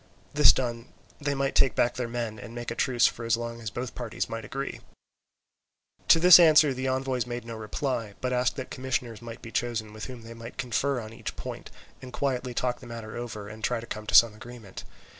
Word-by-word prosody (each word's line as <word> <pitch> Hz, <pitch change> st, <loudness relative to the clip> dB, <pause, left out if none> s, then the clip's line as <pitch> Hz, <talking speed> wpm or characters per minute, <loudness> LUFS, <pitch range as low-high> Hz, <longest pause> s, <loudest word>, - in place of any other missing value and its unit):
This 150 Hz, -4 st, +8 dB
done 120 Hz, -2 st, -3 dB, 0.3 s
they 145 Hz, -1 st, -1 dB
might 135 Hz, 0 st, 0 dB
take 130 Hz, -, +3 dB
back 120 Hz, 0 st, +2 dB
their 125 Hz, -2 st, -3 dB
men, 115 Hz, -2 st, -4 dB
and 115 Hz, +3 st, -9 dB
make 120 Hz, -1 st, -5 dB
a -, -, -3 dB
truce 125 Hz, -1 st, +2 dB
for 120 Hz, -, 0 dB
as 115 Hz, -1 st, +2 dB
long 115 Hz, 0 st, -5 dB
as 110 Hz, -, -4 dB
both 125 Hz, +2 st, -5 dB
parties 120 Hz, -3 st, -4 dB
might 115 Hz, 0 st, -5 dB
agree. 135 Hz, +6 st, -5 dB, 1.3 s
To 165 Hz, -, +7 dB
this 180 Hz, +1 st, +10 dB
answer 155 Hz, -4 st, +6 dB
the 130 Hz, +1 st, -3 dB
envoys 130 Hz, -2 st, -1 dB
made 120 Hz, -1 st, -5 dB
no 115 Hz, -, -6 dB
reply, 110 Hz, -1 st, -3 dB
but 125 Hz, +4 st, -1 dB
asked 125 Hz, 0 st, +1 dB
that 130 Hz, -2 st, -6 dB
commissioners 125 Hz, -3 st, -3 dB
might 115 Hz, -1 st, -9 dB
be 115 Hz, -, -8 dB
chosen 110 Hz, -3 st, -2 dB
with 110 Hz, 0 st, -6 dB
whom 125 Hz, -3 st, -9 dB
they 115 Hz, +1 st, -9 dB
might 115 Hz, 0 st, -10 dB
confer 135 Hz, +1 st, 0 dB
on 110 Hz, -1 st, -8 dB
each -, -, -6 dB
point, -, -, -7 dB, 0.3 s
and 130 Hz, -, -9 dB
quietly 125 Hz, -2 st, -2 dB
talk 125 Hz, 0 st, -1 dB
the 125 Hz, -, -12 dB
matter 115 Hz, -2 st, -7 dB
over 115 Hz, -4 st, -6 dB
and 110 Hz, +1 st, -10 dB
try 120 Hz, -2 st, +1 dB
to 115 Hz, -, -8 dB
come 110 Hz, -2 st, -7 dB
to -, -, 0 dB
some 115 Hz, -2 st, +8 dB
agreement. 110 Hz, -2 st, -10 dB
120 Hz, 220 wpm, -27 LUFS, 115-130 Hz, 1.3 s, this